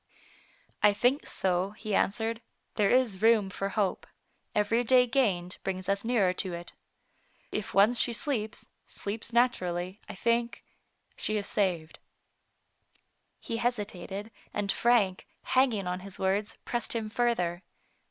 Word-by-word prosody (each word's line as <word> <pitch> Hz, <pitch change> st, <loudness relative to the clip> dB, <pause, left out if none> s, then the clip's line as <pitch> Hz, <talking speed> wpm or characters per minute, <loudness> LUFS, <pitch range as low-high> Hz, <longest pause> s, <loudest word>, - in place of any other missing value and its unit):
" -, -, -31 dB, 0.3 s
I 210 Hz, 0 st, +6 dB
think 245 Hz, +7 st, +1 dB
so, 190 Hz, +2 st, 0 dB
he 215 Hz, -2 st, -4 dB
answered; 225 Hz, +4 st, 0 dB, 0.2 s
" -, -, -46 dB
there 205 Hz, -2 st, +3 dB
is 245 Hz, -7 st, +2 dB
room 220 Hz, -3 st, +4 dB
for 195 Hz, 0 st, -3 dB
hope. 200 Hz, -2 st, -1 dB, 0.5 s
Every 215 Hz, +3 st, +2 dB
day 250 Hz, +1 st, +5 dB
gained 200 Hz, -9 st, 0 dB
brings 185 Hz, -1 st, -3 dB
us 200 Hz, 0 st, +1 dB
nearer 220 Hz, -6 st, +2 dB
to 185 Hz, -2 st, -5 dB
it. 170 Hz, 0 st, -9 dB, 0.8 s
If 210 Hz, -3 st, -4 dB
once 215 Hz, +5 st, +5 dB
she -, -, +3 dB
sleeps, 230 Hz, -3 st, -3 dB, 0.2 s
sleeps 215 Hz, +3 st, -4 dB
naturally, 185 Hz, -6 st, 0 dB
I -, -, -6 dB
think 235 Hz, +4 st, 0 dB, 0.3 s
— -, -, -42 dB
she 215 Hz, -, -1 dB
is 205 Hz, -, -2 dB
saved. 175 Hz, -6 st, -1 dB, 1.4 s
He 230 Hz, -, -4 dB
hesitated, 210 Hz, -3 st, -3 dB, 0.2 s
and 205 Hz, -1 st, +1 dB
Frank, 220 Hz, -6 st, +2 dB, 0.2 s
hanging 250 Hz, -7 st, +2 dB
on 180 Hz, 0 st, -2 dB
his 195 Hz, 0 st, -9 dB
words, 195 Hz, +3 st, 0 dB
pressed 240 Hz, -1 st, 0 dB
him 225 Hz, -2 st, -1 dB
further. 215 Hz, -7 st, 0 dB
210 Hz, 145 wpm, -29 LUFS, 190-235 Hz, 1.4 s, I